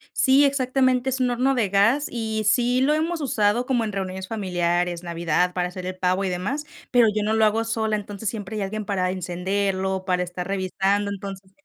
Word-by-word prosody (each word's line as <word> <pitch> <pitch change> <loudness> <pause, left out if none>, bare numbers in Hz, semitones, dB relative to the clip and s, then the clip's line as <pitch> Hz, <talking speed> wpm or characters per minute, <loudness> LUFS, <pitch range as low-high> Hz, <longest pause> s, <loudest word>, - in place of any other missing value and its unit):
Sí, 275 +1 +5
exactamente, 260 -1 +1
es 260 0 -2
un 250 -1 +2
horno 260 +3 +2
de 215 -6 +1
gas 225 +9 +3
y 220 -2 -2
sí 245 +2 +3
lo 295 +3 +3
hemos 320 +1 -1
usado 230 -2 +1
como 245 -3 +1
en 215 - -3
reuniones 190 -1 -4
familiares, 175 -4 -1
Navidad, 170 +1 0
para 180 -1 0
hacer 180 0 -7
el 185 0 -5
pavo 185 +2 +1
y 190 - 0
demás, 240 +12 -3 0.3
pero 240 -3 +5
yo 210 -1 0
no 215 +1 0
lo 220 0 +4
hago 220 +2 +2
sola, 220 -1 -1
entonces, 205 0 -4
siempre 215 -1 -6
hay - - -2
alguien 215 +1 -4
para 185 -3 0
encenderlo, 190 +1 -2
para 180 -1 +1
estar 180 +1 -6
revisando. 195 +1 0
Entonces 195 -1 -7
205 Hz, 200 wpm, -24 LUFS, 185-240 Hz, 0.3 s, Sí